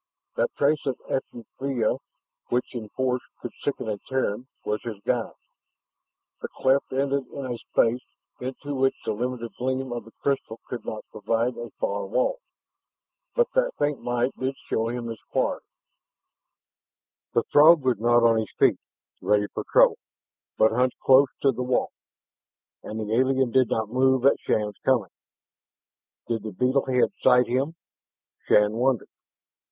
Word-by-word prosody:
That - - +1
trace 145 +1 +2
of 130 - -1
effluvia 130 -1 -2 0.5
which 125 +1 -1
in 110 -4 -6
force 125 0 -1 0.2
could 120 - -7
sicken 140 -5 -4
a 105 -2 -2
Terran, 130 -2 -1 0.2
was 105 0 -1
his 115 -4 -6
guide. 120 -3 -1 1.1
The - - -3
cleft 135 +1 +2
ended 135 0 0
in 140 +1 -7
a 120 -2 -3
space 120 +2 +1 0.6
to 145 0 -4
which 135 0 +2
the - - 0
limited 120 +1 -3
gleam 130 0 -1
of 120 - -5
the 115 - -14
crystal 135 -5 -1
could 125 - -6
not 110 - -5
provide 115 +4 -1
a 120 - -7
far - - -1
wall. - - 0 1.0
But 485 -1 +2
that - - +1
faint 145 -1 0
light 120 +1 0
did 130 +1 -1
show 110 0 -2
him 120 0 -4
his 115 -1 -6
quarry. - - 0 1.7
The - - +3
Throg 155 +1 +7
was 125 -5 +1
not 120 +1 +4
on 115 -1 +5
his 110 - -4
feet, - - +4 0.4
ready 105 0 +2
for - - -3
trouble, - - +5 0.6
but 110 - +5
hunched 125 +2 +1
close 135 +1 +6 0.2
to 135 - +5
the 125 - -5
wall. 125 0 0 0.9
And 110 - -6
the 110 0 -3
alien 130 +1 +2
did 130 -1 +3
not 110 -2 -1
move 130 0 +3
at 140 - +5
Shann's 105 -2 -1
coming. 120 -9 +2 1.2
Did 115 -2 -1
the 110 -1 -6
beetle 130 +7 +1
head 125 +5 +2
sight 125 -1 +5
him? 135 +7 -1 0.7
Shann 105 0 +5
wondered. 125 -1 +1
125 Hz, 155 wpm, -25 LUFS, 115-135 Hz, 1.7 s, Throg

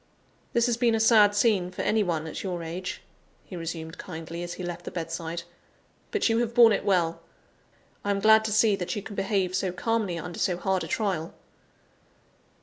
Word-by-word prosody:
"This 235 -1 +3
has 240 -2 +1
been 235 -2 +3
a - - 0
sad 215 -2 +5
scene 205 -4 +2
for 185 - -5
any 220 0 +2
one 165 -5 -1
at 160 - -6
your 180 -3 -4
age," 175 +3 -5 0.4
he 185 - -9
resumed 165 -1 -6
kindly, 165 -1 -7
as 175 0 -5
he 185 - -7
left 175 -1 -5
the - - -5
bedside, 165 0 -4 0.7
"but 425 - +1
you 225 0 +2
have 235 -1 -1
borne 235 -2 +8
it - - -1
well. 175 -4 +1 0.8
I 205 - -3
am 200 0 +1
glad 220 +1 +6
to 220 - -1
see 215 -1 +4
that 180 - -3
you 205 - -4
can 205 - -8
behave 195 -2 0
so 190 -1 0
calmly 205 -1 -1
under 175 +1 -6
so 180 -2 +1
hard 190 +1 0
a - - -5
trial." 195 -10 -2
190 Hz, 200 wpm, -27 LUFS, 170-220 Hz, 0.8 s, borne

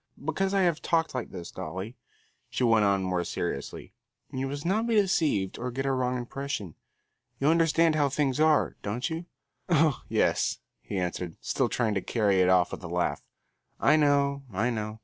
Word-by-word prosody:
Because 190 +5 0
I 195 -1 +2
have 170 -3 +1
talked 165 -1 +1
like 125 -3 -3
this, 90 -2 -8
Dolly," 95 +9 -6 0.5
she - - -2
went 115 -3 +4
on 100 -1 +2
more 90 -1 0
seriously, - - -4 0.4
"you 130 +1 -2
must 145 +3 -5
not 215 +6 +1
be 230 - +1
deceived 160 - +1
or 125 +1 -3
get 135 +2 -3
a 135 - +1
wrong 125 -1 0
impression. 120 - -4 0.7
You 140 - +3
understand 165 0 +4
how 145 -2 +2
things 140 -1 0
are, 155 -1 +3
don't 115 +5 -2
you?" 165 +2 -4 0.4
"Oh, 160 -4 +3
yes," - - +1 0.2
he 100 - -5
answered, 90 -2 -3
still - - 0
trying 115 -4 0
to 100 - 0
carry 100 -4 +2
it 90 - +4
off 90 -1 +4
with - - -7
a - - -5
laugh. 85 -4 -1 0.6
"I 150 - +5
know, 140 -2 +2
I 110 +6 0
know. 110 -1 -4
130 Hz, 185 wpm, -28 LUFS, 100-155 Hz, 0.7 s, I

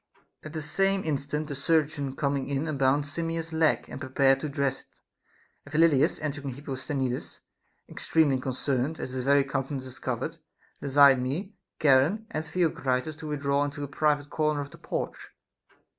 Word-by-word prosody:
IT. - - -8
At 155 - -10
the 155 -2 -3
same 195 +5 +1
instant 150 0 -2
the 145 - -4
chirurgeon 145 -1 0
coming 140 -1 -1
in 140 +3 -1
un 155 - -2
bound 135 +2 +2
Simmias's 165 +1 -3
leg 160 -1 +2
and - - -8
prepared 135 0 +3
to 150 - -3
dress 140 -1 -1
it; - - -29 0.6
and 145 - -14
Phyl 160 +2 +6
lidas 150 +2 +2
entering 145 -1 -3
with 130 - -4
Hipposthenides, 130 -1 -3 0.5
extremely 145 -5 +2
concerned, 130 +3 -1
as - - -4
his 130 -1 -3
very 140 0 +5
countenance 135 0 -3
discovered, 130 -1 -4 0.4
desired 140 -2 +6
me, 160 - -3 0.3
Charon, 150 +10 +4
and 155 - -2
Theocritus 155 -4 0
to 160 -1 -7
withdraw 140 -1 +1
into 145 0 -4
a - - -3
private 145 0 0
corner 155 -2 +1
of 140 0 -7
the - - -14
porch. - - -4
145 Hz, 170 wpm, -28 LUFS, 135-155 Hz, 0.6 s, Phyl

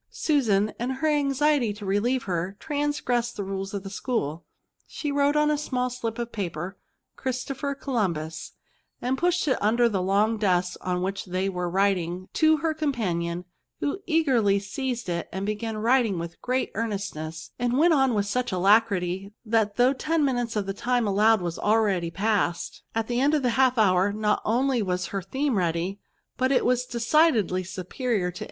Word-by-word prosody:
Susan, 215 -9 +1
in 240 +2 -1
her 265 +4 -1
anxiety 290 -4 +2
to 205 0 -8
relieve 230 +6 +1
her, 185 +1 -3
transgressed 285 -5 -1
the 205 - -2
rules 195 0 -4
of 200 -2 -4
the 195 - -6
school; 180 - -2 0.4
she 295 - -4
wrote 285 +1 +2
on 300 0 +3
a 300 - +1
small 250 -4 -1
slip 230 -2 -4
of 235 0 -4
paper 180 -3 -4 0.2
" - - -56
Christopher 270 +2 -3
Columbtis/* 175 - -2 0.5
and 255 +2 0
pushed 350 +2 +1
it 265 - +2
under 235 +3 +3
the 200 -5 -1
long 205 +4 +2
desk 180 -3 +1
on 180 0 -1
which 195 +1 -3
they 185 +1 -1
were 180 -2 -2
writing 185 -1 0
to 315 0 +4
her 320 +1 0
companion, 180 - -2 0.3
who 290 +7 -2
eagerly 260 - +3
seized 240 +4 -3
it, 170 -1 -3 0.2
began 215 +1 -3
writing 230 -3 +2
with 170 0 -6
great 255 +1 -1
earnestness, 195 -7 -4
and 245 +1 +1
went 330 +3 +5
on 270 -5 +3
with 205 -1 +1
such 245 +4 -1
alacrity 195 -1 +2
that 215 -2 +1
though 250 +2 +4
ten 310 +2 0
minutes 245 -4 -1
of 210 -2 0
the 195 - -3
time 245 +3 0
allowed 210 +1 +4
was 170 -1 -3
already 205 -5 +2
past, 195 -1 -1
at 225 -1 0
the 240 +1 -1
end 290 +3 +3
of 290 - 0
the 245 - +2
half 255 +1 +3
hour 190 -2 +4
not 210 0 0
only 250 +2 +2
was 180 -2 -2
her 195 - -1
theme 265 +2 -1
ready, 175 +3 -1 0.4
but 260 +1 +1
it 270 - +3
was 250 0 +1
decidedly 235 - +2
superior 185 +2 -2
to. 180 - -10
220 Hz, 175 wpm, -26 LUFS, 190-260 Hz, 0.5 s, went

